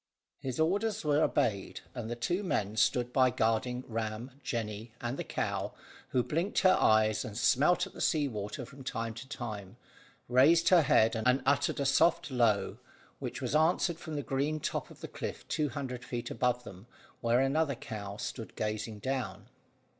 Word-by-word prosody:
His 130 0 -4
orders 200 +5 +1
were 150 0 +3
obeyed, 110 -11 0
and 120 -3 -5
the 120 - -2
two 175 - -1
men 110 - -1
stood 120 +2 +2
by 130 -1 +5
guarding 125 +2 0
Ram, 115 +2 -4
Jemmy, 110 -3 -4
and 120 +2 -3
the - - -4
cow, - - -2 0.4
who 125 - +2
blinked 170 +10 0
her 185 -1 +6
eyes 110 -4 +3
and 105 - -7
smelt 155 +10 +3
at 195 - -12
the - - -8
sea 150 -3 +2
water 110 +3 -5
from 135 +2 -12
time 115 -3 -3
to 120 +4 -10
time, 105 -5 -6 0.5
raised 140 +7 +5
her 180 -3 +7
head 125 -6 +4
and 125 +4 +2
uttered 140 +1 +2
a 140 - 0
soft 160 +3 +3
low, 115 -5 +2 0.4
which - - -5
was - - -2
answered 165 +2 +2
from 160 -3 -6
the 145 - -2
green 140 +4 -1
top - - -3
of - - -15
the - - -5
cliff - - -6
two 150 -2 0
hundred 130 -3 -5
feet 120 -2 -4
above 125 -1 0
them, 95 0 -11 0.3
where 120 +1 +2
another 140 +2 +2
cow 100 -3 -7
stood 115 +1 -6
gazing 110 0 -3
down. 105 -4 -4
125 Hz, 175 wpm, -31 LUFS, 110-150 Hz, 0.5 s, her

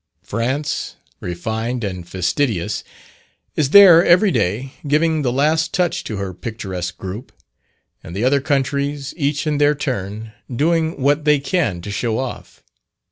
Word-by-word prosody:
France, 130 +7 -2 0.2
refined 110 +7 -3
and 90 -4 -5
fastidious, 100 - -1 0.7
is 150 -3 +1
there 180 -2 +9
every 185 +4 +5
day, 115 - -1
giving 155 +2 +2
the 125 -4 0
last 155 +5 +1
touch 180 -2 0
to 110 - -4
her 95 -1 -4
picturesque 90 -3 -5
group; 100 +7 -7 0.7
and 85 - -9
the 105 - -2
other 135 +2 +3
countries, 140 0 -1
each 145 -2 -1
in 150 -2 0
their 145 0 +4
turn, 110 -6 -4 0.2
doing 160 +5 0
what 145 +3 +2
they 150 0 +4
can 140 - -1
to 100 - -6
show 110 +2 -1
off. 130 -1 -6
130 Hz, 140 wpm, -20 LUFS, 105-150 Hz, 0.7 s, there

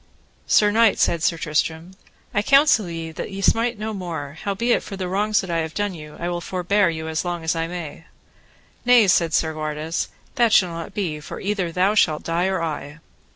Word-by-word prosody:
Sir 210 -1 +4
knight, 225 -1 +4
said 170 - +2
Sir 165 +1 +1
Tristram, 160 +3 -2 0.4
I 205 - +2
counsel 275 - +4
you 165 -1 -6
that - - -5
ye 195 -1 -7
smite 230 +4 +2
no 215 +1 -4
more, 160 -7 -5
howbeit 205 +5 0
for 195 - -8
the 185 -1 -3
wrongs 205 +3 +1
that 185 - -6
I 165 - +1
have 160 -1 -4
done 205 -1 -1
you 150 -3 -10
I 170 - -3
will 175 0 -2
forbear 185 +2 +1
you 160 -1 -4
as 160 0 -2
long 175 -2 -3
as 160 +1 0
I 165 0 -1
may. 165 -2 -7 0.8
Nay, 245 -2 +6
said 170 -2 +3
Segwarides, 155 0 -1 0.3
that 235 -2 +3
shall 185 -5 +5
not 170 +4 -7
be, 170 -7 -2
for 150 - -8
either 195 -4 -2
thou 185 +4 +2
shalt 160 -7 +2
die 170 +2 0
or 190 -3 -1
I. 150 -2 -5
175 Hz, 200 wpm, -22 LUFS, 160-205 Hz, 0.8 s, Nay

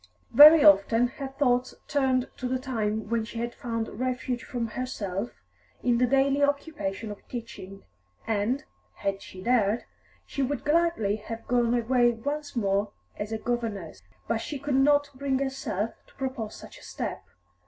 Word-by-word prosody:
Very 300 +4 +10
often 240 -3 +5
her 270 +1 -6
thoughts 255 -2 0
turned 260 -3 +1
to 250 - -3
the 255 +1 0
time 220 -5 -2
when 230 0 0
she 230 +1 -8
had 235 +1 -3
found 230 -2 -3
refuge 255 -1 -2
from 240 -4 -3
herself 215 -4 -3 0.5
in 240 -1 +2
the 250 - +4
daily 275 +2 +3
occupation 280 -8 -1
of 205 - -8
teaching, 225 -5 -8 0.4
and, 225 +6 0 0.3
had 195 0 -2
she 185 0 -10
dared, 230 -2 +2 0.4
she 275 - -4
would 270 0 -2
gladly 300 -10 +2
have 225 +2 -8
gone 240 -1 +2
away 240 0 +3
once 285 +5 -4
more 200 -2 0 0.2
as 205 +1 -4
a 220 - -1
governess. 220 - -3 0.3
But 230 - +1
she 285 +6 -5
could 285 +1 -3
not 285 +2 +4
bring 270 0 -1
herself 265 -6 -2 0.2
to - - -23
propose 260 -5 -4
such - - -12
a - - -17
step. - - -5
245 Hz, 160 wpm, -27 LUFS, 220-270 Hz, 0.5 s, Very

